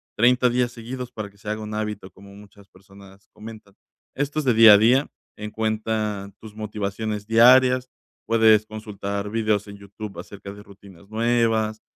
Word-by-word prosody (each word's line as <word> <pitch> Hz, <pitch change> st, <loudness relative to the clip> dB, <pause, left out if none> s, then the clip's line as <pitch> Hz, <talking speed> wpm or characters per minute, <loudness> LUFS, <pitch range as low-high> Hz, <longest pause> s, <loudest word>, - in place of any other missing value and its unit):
30 125 Hz, +3 st, +3 dB
días 120 Hz, 0 st, 0 dB
seguidos 125 Hz, +1 st, -8 dB
para 105 Hz, -2 st, -7 dB
que 100 Hz, -, -26 dB
se 105 Hz, -, -8 dB
haga 110 Hz, 0 st, -3 dB
un 105 Hz, 0 st, -7 dB
hábito, 105 Hz, -3 st, -5 dB
como 100 Hz, 0 st, -16 dB
muchas 100 Hz, -1 st, -17 dB
personas 95 Hz, +1 st, -18 dB
comentan, 110 Hz, -2 st, -12 dB, 0.4 s
esto 145 Hz, +2 st, -3 dB
es 150 Hz, -, -4 dB
de 125 Hz, -, +3 dB
día 110 Hz, -1 st, +8 dB
a -, -, +8 dB
día, 125 Hz, +7 st, +3 dB, 0.3 s
en 105 Hz, 0 st, -6 dB
cuenta 110 Hz, -2 st, -3 dB
tus 110 Hz, -1 st, -13 dB
motivaciones 105 Hz, 0 st, -4 dB
diarias, 125 Hz, +3 st, +5 dB, 0.4 s
puedes 110 Hz, -1 st, +4 dB
consultar 105 Hz, -1 st, -6 dB
videos 110 Hz, -2 st, 0 dB
en 100 Hz, -, -10 dB
YouTube 100 Hz, +1 st, -10 dB
acerca 100 Hz, -1 st, -10 dB
de 100 Hz, -, -13 dB
rutinas 100 Hz, -1 st, -17 dB
nuevas, 110 Hz, -1 st, 0 dB
110 Hz, 165 wpm, -23 LUFS, 100-115 Hz, 0.4 s, día